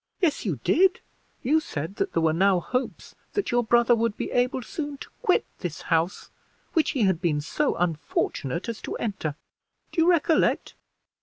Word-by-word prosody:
"Yes, 330 Hz, -, +1 dB
you 155 Hz, -10 st, -1 dB
did; 380 Hz, +2 st, +4 dB, 0.4 s
you 300 Hz, +6 st, +4 dB
said 185 Hz, -, -5 dB
that -, -, -1 dB
there 165 Hz, -, +1 dB
were 160 Hz, -1 st, +3 dB
now 190 Hz, +2 st, +4 dB
hopes 250 Hz, +9 st, -3 dB, 0.2 s
that 410 Hz, -, -1 dB
your 240 Hz, 0 st, +3 dB
brother 240 Hz, +1 st, +4 dB
would 230 Hz, -2 st, 0 dB
be -, -, -3 dB
able 250 Hz, +1 st, +1 dB
soon 295 Hz, -2 st, -5 dB
to -, -, -10 dB
quit 365 Hz, -, +3 dB
this 170 Hz, -3 st, -5 dB
house 165 Hz, +3 st, 0 dB, 0.4 s
which 320 Hz, -3 st, +3 dB
he 235 Hz, -, +3 dB
had 190 Hz, -4 st, +2 dB
been 160 Hz, -5 st, +1 dB
so 275 Hz, -, 0 dB
unfortunate 165 Hz, -2 st, -1 dB
as 230 Hz, -2 st, -5 dB
to -, -, -4 dB
enter. 190 Hz, -9 st, -3 dB, 0.6 s
Do 330 Hz, -, +1 dB
you 335 Hz, -, +5 dB
recollect?" 330 Hz, -2 st, +2 dB
230 Hz, 175 wpm, -26 LUFS, -, 0.6 s, you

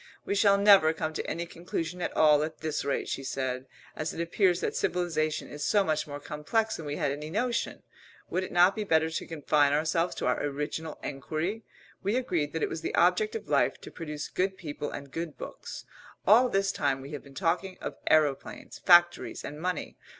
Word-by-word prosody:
"We -, -, -1 dB
shall 200 Hz, 0 st, +5 dB
never 200 Hz, -6 st, +6 dB
come 155 Hz, 0 st, -3 dB
to -, -, -4 dB
any 170 Hz, +1 st, -2 dB
conclusion 170 Hz, 0 st, -5 dB
at -, -, -3 dB
all 150 Hz, -2 st, +6 dB
at 155 Hz, +1 st, -4 dB
this 155 Hz, -2 st, -2 dB
rate," 140 Hz, -, -1 dB
she 135 Hz, -, -3 dB
said. 130 Hz, -1 st, -3 dB, 0.3 s
"As 155 Hz, 0 st, -3 dB
it -, -, -6 dB
appears 175 Hz, +1 st, +2 dB
that -, -, -2 dB
civilisation 160 Hz, -3 st, 0 dB
is 145 Hz, 0 st, -6 dB
so 205 Hz, -1 st, +3 dB
much 155 Hz, -4 st, -1 dB
more 145 Hz, 0 st, -6 dB
complex 155 Hz, +10 st, -1 dB
than 160 Hz, -, -7 dB
we 145 Hz, -, -2 dB
had 140 Hz, -, 0 dB
any 150 Hz, +2 st, -5 dB
notion, 235 Hz, +7 st, -1 dB, 0.4 s
would 185 Hz, -, -1 dB
it -, -, -6 dB
not 180 Hz, +2 st, +5 dB
be 215 Hz, -, -2 dB
better 160 Hz, -4 st, +2 dB
to -, -, -4 dB
confine 150 Hz, -2 st, +2 dB
ourselves 160 Hz, +3 st, +1 dB
to -, -, -3 dB
our 125 Hz, -, +1 dB
original 150 Hz, +2 st, -3 dB
enquiry? 155 Hz, +9 st, -3 dB, 0.4 s
We 200 Hz, +4 st, 0 dB
agreed 175 Hz, -, 0 dB
that 160 Hz, -, -1 dB
it -, -, +2 dB
was 160 Hz, -, -5 dB
the -, -, -2 dB
object 435 Hz, 0 st, +3 dB
of 450 Hz, -, -5 dB
life -, -, +2 dB
to -, -, -10 dB
produce 150 Hz, -3 st, -5 dB
good 190 Hz, +1 st, -1 dB
people 150 Hz, -3 st, -5 dB
and 140 Hz, -1 st, -8 dB
good 165 Hz, -1 st, -5 dB
books. -, -, -8 dB, 0.4 s
All 240 Hz, +5 st, +6 dB
this 195 Hz, -1 st, +1 dB
time 135 Hz, -2 st, 0 dB
we 135 Hz, +2 st, -9 dB
have 145 Hz, -, -5 dB
been 140 Hz, -1 st, -15 dB
talking 180 Hz, +5 st, -1 dB
of -, -, -5 dB
aeroplanes, 150 Hz, -3 st, +1 dB
factories, 175 Hz, -1 st, +4 dB
and 150 Hz, +2 st, -7 dB
money. 180 Hz, -2 st, -3 dB
160 Hz, 205 wpm, -29 LUFS, 150-185 Hz, 0.4 s, never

